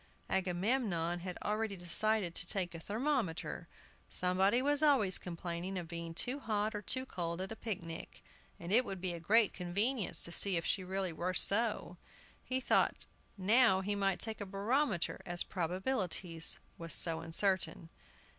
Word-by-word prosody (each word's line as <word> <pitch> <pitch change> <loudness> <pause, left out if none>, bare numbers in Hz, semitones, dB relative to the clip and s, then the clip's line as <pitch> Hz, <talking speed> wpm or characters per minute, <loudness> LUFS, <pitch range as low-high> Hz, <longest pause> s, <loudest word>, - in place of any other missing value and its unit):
Agamemnon 185 -2 0
had 180 0 -6
already 210 -1 -2
decided 180 +2 +2
to 175 - +1
take 180 -2 +1
a 165 - -7
thermometer; 220 - -2 0.4
somebody 190 +5 +2
was 290 +2 +1
always 265 -11 +5
complaining 175 +2 -5
of 175 -2 -5
being 170 -1 -6
too 255 - 0
hot 215 -3 -1
or 210 - -4
too 260 +5 -1
cold 170 -7 -4
at 190 +2 -4
a - - -4
picnic, 175 -8 -5 0.4
and 170 +3 -3
it 245 +3 +7
would 195 -6 -6
be 180 -1 0
a 170 - -6
great 215 +6 +4
convenience 200 +6 -1
to 170 - +1
see 190 +1 +4
if 165 - -2
she 190 - +1
really 190 -1 -2
were 180 +3 -3
so. 210 -4 +2 0.5
He 260 0 0
thought 260 - +1 0.3
now 200 0 +4
he 205 +2 -2
might 195 -3 0
take 220 +1 -3
a - - -3
barometer, 205 - 0
as 175 0 0
"Probabilities" 180 -2 -1 0.2
was 165 0 0
so 165 -1 +2
uncertain. 165 -1 -1
190 Hz, 160 wpm, -34 LUFS, 175-220 Hz, 0.5 s, it